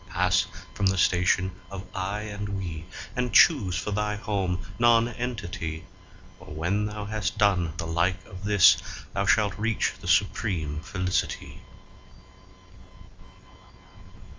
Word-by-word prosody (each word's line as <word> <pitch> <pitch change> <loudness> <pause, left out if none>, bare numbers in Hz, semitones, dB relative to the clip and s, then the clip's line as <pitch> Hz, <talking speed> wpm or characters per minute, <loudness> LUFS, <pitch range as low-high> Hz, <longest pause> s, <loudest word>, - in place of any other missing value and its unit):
Pass 95 +1 +2 0.3
from 100 - +1
the 95 0 +1
station 90 +1 +2 0.2
of 95 -1 -7
"I" 100 +2 -3
and 105 -1 -5
"We," 85 -4 -5 0.3
and 125 -1 -1
choose 100 - +5
for 95 +3 -3
thy 105 +1 -1
home 95 -3 -2
Nonentity, 115 -8 0 0.5
For - - -14
when 90 +8 -1
thou 105 0 -5
has 105 -1 -1
done 95 -6 +1
the 85 - -3
like 85 +3 0
of 95 +1 -11
this, 100 -3 +6 0.4
thou - - -1
shalt 105 -2 +2
reach 110 0 0
the 95 - -9
supreme 90 -5 +1
Felicity. 90 +2 -3
95 Hz, 120 wpm, -26 LUFS, 90-105 Hz, 0.5 s, this